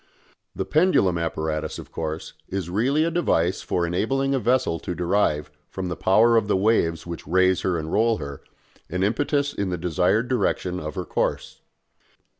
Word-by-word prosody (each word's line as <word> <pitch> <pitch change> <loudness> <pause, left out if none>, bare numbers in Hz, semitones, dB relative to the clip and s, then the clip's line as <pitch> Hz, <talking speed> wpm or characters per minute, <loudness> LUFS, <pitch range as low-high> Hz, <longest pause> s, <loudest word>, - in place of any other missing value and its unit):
The 95 - -2
pendulum 100 - +3
apparatus, 80 -2 -2
of - - -10
course, 80 0 -5 0.2
is 95 -3 -3
really 135 - +2
a 165 - 0
device 95 - +1
for 85 - -1
enabling 135 +11 0
a 135 - +1
vessel 120 -7 +1
to 90 - -5
derive, 85 -5 0 0.2
from 95 -1 -4
the 85 - -3
power 115 +7 +4
of 110 - +1
the 105 - +2
waves 95 -5 +1
which 85 -3 -7
raise 95 +2 +3
her 90 -2 0
and 80 0 -5
roll 115 +1 +3
her, 70 -2 -7 0.5
an 90 +3 -1
impetus 140 +6 0
in 100 -2 -2
the 90 - -2
desired 90 +7 +1
direction 95 -6 0
of 75 +1 -6
her 90 -2 -3
course. - - -2
95 Hz, 175 wpm, -24 LUFS, 85-115 Hz, 0.5 s, power